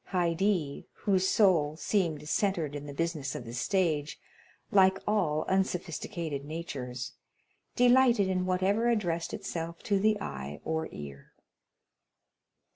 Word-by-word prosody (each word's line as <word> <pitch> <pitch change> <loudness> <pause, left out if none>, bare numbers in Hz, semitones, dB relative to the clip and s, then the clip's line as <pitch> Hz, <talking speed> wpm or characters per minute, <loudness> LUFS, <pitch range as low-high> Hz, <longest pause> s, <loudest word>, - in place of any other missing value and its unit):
Haydée, 175 -3 0 0.2
whose 190 -2 +2
soul 165 -8 +3
seemed 160 -7 0
centred 170 -5 0
in 145 0 -6
the - - -6
business 155 -4 -2
of 120 - -6
the 115 - -8
stage, 155 - 0 0.5
like 190 -1 +5
all 175 -8 +1
unsophisticated 170 -5 -2
natures, 135 -6 -5 0.6
delighted 245 -4 +5
in 185 -1 0
whatever 195 +6 +2
addressed 175 -8 0
itself 165 0 -5
to 200 -1 +1
the 215 +1 +2
eye 70 +1 -6
or 160 0 -2
ear. 70 -1 -10
170 Hz, 120 wpm, -30 LUFS, 145-195 Hz, 0.6 s, like